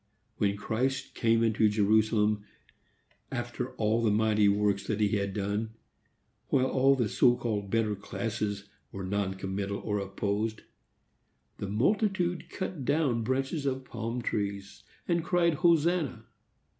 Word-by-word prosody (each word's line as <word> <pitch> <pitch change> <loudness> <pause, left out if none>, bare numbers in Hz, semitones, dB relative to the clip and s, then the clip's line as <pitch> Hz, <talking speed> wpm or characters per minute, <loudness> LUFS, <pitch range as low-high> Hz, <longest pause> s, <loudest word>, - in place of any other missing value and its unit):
When 100 -1 +1
Christ 125 +6 -2
came 115 0 +2
into 110 -1 +3
Jerusalem, 105 0 +2 0.9
after 125 0 -4
all 110 0 +1
the 115 - +3
mighty 105 -1 +3
works 100 -1 +1
that 110 -1 -1
he 105 -1 +3
had 100 0 -1
done, 105 +3 -2 0.7
while 130 -1 +2
all 135 +1 +3
the 120 -5 +1
so 120 +4 +4
called 105 -5 -2
better 110 0 +1
classes 100 0 -4 0.2
were 95 - -6
non 95 0 -1
committal 100 +1 -3
or 105 -1 -2
opposed, 100 +3 -2 1.0
the 100 - -4
multitude 180 - +1
cut 180 -6 -4
down 135 -4 +1
branches 135 +5 -1
of 130 -1 -2
palm 115 0 -4
trees 100 -2 -3 0.3
and 170 -2 +1
cried 170 -1 +2
Hosanna! 165 -7 +2
110 Hz, 130 wpm, -29 LUFS, 100-130 Hz, 1.0 s, so